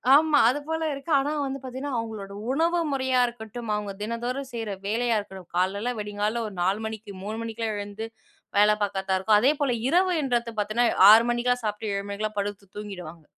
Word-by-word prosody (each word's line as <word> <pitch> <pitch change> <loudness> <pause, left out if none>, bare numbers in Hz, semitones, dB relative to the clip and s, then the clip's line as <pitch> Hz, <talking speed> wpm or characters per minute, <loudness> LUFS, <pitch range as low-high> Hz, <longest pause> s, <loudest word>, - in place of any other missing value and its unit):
ஆமா 305 0 +5
அது 255 +5 +2
போல 320 0 -2
இருக்கு, 275 +4 -6
ஆனா 280 +2 -1
வந்து 270 0 -4
பார்த்தீங்கன்னா, 260 +2 -5
அவங்களோட 215 -3 -5 0.2
உணவு 335 +5 +2
முறையா 260 -2 +1
இருக்கட்டும், 235 0 -7
அவங்க 210 -1 -3
தினந்தோறும் 240 +5 -3
செய்ற 225 -3 -3 0.2
வேலையா 230 +2 +1
இருக்கட்டும், 190 -3 -10
காலைல 200 +7 0
வெடிங்காலையில 210 +2 -2
ஒரு 210 - -8
4 195 +5 +1
மணிக்கு 220 -1 -6
3 215 +3 -4
மணிக்கெல்லாம் 225 -1 -3
எழுந்து 205 +2 -5 0.5
வேலை 210 +1 +6
பார்க்கர்தா 195 -1 -1
இருக்கும், 210 +2 +4
அதே 265 +5 +5
போல 280 -3 +2 0.2
இரவுன்றது 275 -9 +1
பார்த்தீங்கன்னா 215 +4 +2 0.2
6 225 +2 +8
மணிக்கெல்லாம் 245 0 0
சாப்பிட்டு 210 0 -2
7 200 0 -3
மணிக்கெல்லாம் 210 +1 -3
படுத்து 200 0 -4
தூங்கிடுவாங்க. 180 -6 -8
220 Hz, 170 wpm, -26 LUFS, 205-250 Hz, 0.5 s, 6